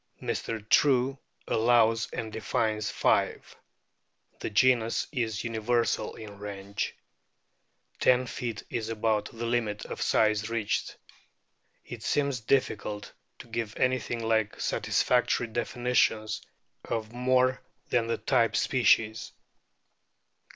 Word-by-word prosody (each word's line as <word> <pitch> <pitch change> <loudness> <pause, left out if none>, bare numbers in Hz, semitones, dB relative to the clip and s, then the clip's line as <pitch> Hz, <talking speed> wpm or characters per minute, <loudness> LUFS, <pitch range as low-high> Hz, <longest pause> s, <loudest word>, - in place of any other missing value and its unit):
Mr. 110 -2 -4
True 135 +1 +3 0.3
allows 115 -1 +3
and 110 -1 -5
defines 110 0 -1
five. - - 0 0.8
The - - -3
genus 115 +1 +3
is 115 -6 -2
universal 115 +1 0
in 105 -2 -10
range. 100 0 -4 1.0
Ten 125 0 +4
feet 115 -2 -5
is 115 -2 -2
about 110 -1 0
the 115 +1 -6
limit 115 -3 -1
of - - -6
size 110 0 +2
reached. 115 -3 -2 0.9
It - - -8
seems 140 -3 0
difficult 105 -4 -1 0.2
to - - -12
give 115 -2 -4
anything 125 -3 0
like 110 -2 +1
satisfactory 125 0 +1
definitions 120 -2 0 0.4
of 110 -1 -3
more 130 +1 +2 0.3
than 120 -2 +1
the 115 - 0
type 115 -1 +2
species. 115 -3 +2
115 Hz, 105 wpm, -28 LUFS, 110-125 Hz, 1.0 s, Ten